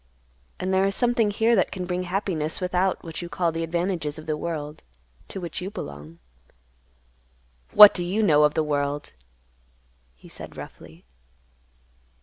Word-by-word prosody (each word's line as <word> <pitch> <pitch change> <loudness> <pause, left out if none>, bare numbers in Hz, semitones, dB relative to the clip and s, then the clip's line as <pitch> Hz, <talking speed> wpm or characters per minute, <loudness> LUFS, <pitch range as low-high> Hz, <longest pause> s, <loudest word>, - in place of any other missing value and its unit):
And 190 - -2
there 190 +1 +3
is 195 0 0
something 240 -3 +2
here 225 +3 +2
that 190 - +2
can 185 -1 -5
bring 180 0 -2
happiness 180 -5 -1
without 185 0 0
what 165 -1 -7
you 175 - -7
call 170 -2 0
the 165 +1 -3
advantages 170 -2 -2
of 155 - -10
the 155 -1 -1
world 150 -2 -5 0.5
to 195 - -7
which 175 -1 -5
you 185 - -4
belong." 75 - -9 1.6
"What 210 -1 +10
do 175 - -2
you 195 +5 0
know 150 -7 +4
of 150 0 +3
the 160 - +2
world?" 145 -1 -2 1.0
he - - -17
said - - -10
roughly. - - -12
175 Hz, 155 wpm, -24 LUFS, 150-190 Hz, 1.6 s, What